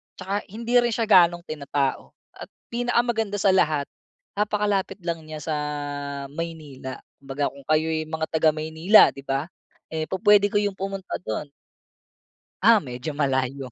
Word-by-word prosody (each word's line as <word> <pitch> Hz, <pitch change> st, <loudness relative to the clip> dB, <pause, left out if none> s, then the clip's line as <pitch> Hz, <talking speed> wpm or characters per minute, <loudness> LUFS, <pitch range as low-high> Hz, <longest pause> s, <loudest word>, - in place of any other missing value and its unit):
'Tsaka 195 Hz, +2 st, -4 dB
hindi 235 Hz, +4 st, +1 dB
rin 240 Hz, 0 st, +2 dB
siya 230 Hz, -, 0 dB
gano'ng 175 Hz, -5 st, +5 dB
tinatao, 140 Hz, -3 st, -3 dB, 0.2 s
at -, -, -10 dB, 0.2 s
pinakamaganda 235 Hz, -3 st, 0 dB
sa 195 Hz, -1 st, +3 dB
lahat, 155 Hz, -6 st, +1 dB, 0.5 s
napakalapit 205 Hz, -2 st, 0 dB
lang 170 Hz, -1 st, -2 dB
niya 155 Hz, -1 st, -7 dB
sa, 155 Hz, 0 st, -2 dB, 0.8 s
Maynila. 150 Hz, -5 st, -7 dB, 0.2 s
Kumbaga 140 Hz, +1 st, -2 dB
kung 140 Hz, -1 st, -15 dB
kayo'y 155 Hz, 0 st, +1 dB
mga 160 Hz, 0 st, -2 dB
taga 160 Hz, 0 st, +4 dB
Maynila 160 Hz, +7 st, +5 dB
'di 140 Hz, -, -11 dB
ba, 135 Hz, +6 st, -2 dB, 0.4 s
eh 160 Hz, -1 st, -3 dB
pupuwede 205 Hz, +2 st, +4 dB
kayong 205 Hz, -1 st, -1 dB
pumunta 195 Hz, 0 st, -4 dB
dun. 140 Hz, +1 st, -5 dB, 1.1 s
Ah, 225 Hz, +2 st, +6 dB
medyo 125 Hz, +4 st, -6 dB
malayo 135 Hz, -2 st, -1 dB
165 Hz, 135 wpm, -24 LUFS, 145-205 Hz, 1.1 s, Ah